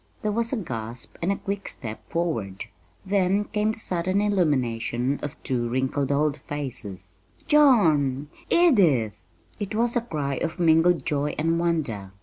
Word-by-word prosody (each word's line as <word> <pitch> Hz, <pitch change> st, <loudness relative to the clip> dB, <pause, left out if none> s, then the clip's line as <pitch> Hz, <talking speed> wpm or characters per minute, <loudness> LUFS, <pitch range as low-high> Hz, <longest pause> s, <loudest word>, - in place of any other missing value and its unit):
There 215 Hz, -, +1 dB
was 230 Hz, +2 st, 0 dB
a 265 Hz, -, 0 dB
gasp 120 Hz, -, -6 dB
and 175 Hz, +4 st, +1 dB
a -, -, +1 dB
quick 200 Hz, 0 st, -4 dB
step 110 Hz, -4 st, -6 dB
forward; 115 Hz, -, -2 dB, 0.4 s
then 195 Hz, +1 st, +2 dB
came 210 Hz, +1 st, 0 dB
the -, -, -10 dB
sudden 185 Hz, -2 st, 0 dB
illumination 135 Hz, -, 0 dB
of 145 Hz, +1 st, -5 dB
two 120 Hz, -2 st, -1 dB
wrinkled 130 Hz, +2 st, 0 dB
old 145 Hz, +1 st, +1 dB
faces. 100 Hz, -10 st, -6 dB, 0.3 s
"John! 155 Hz, -, +4 dB, 0.2 s
Edith!" 175 Hz, -, +4 dB, 0.5 s
it 205 Hz, 0 st, -4 dB
was 235 Hz, +2 st, +1 dB
a 240 Hz, -, +2 dB
cry 145 Hz, -, -3 dB
of 170 Hz, +2 st, -3 dB
mingled 165 Hz, +1 st, +4 dB
joy 145 Hz, 0 st, -1 dB
and 165 Hz, +2 st, +1 dB
wonder. 140 Hz, -, -1 dB
155 Hz, 145 wpm, -25 LUFS, 130-200 Hz, 0.5 s, John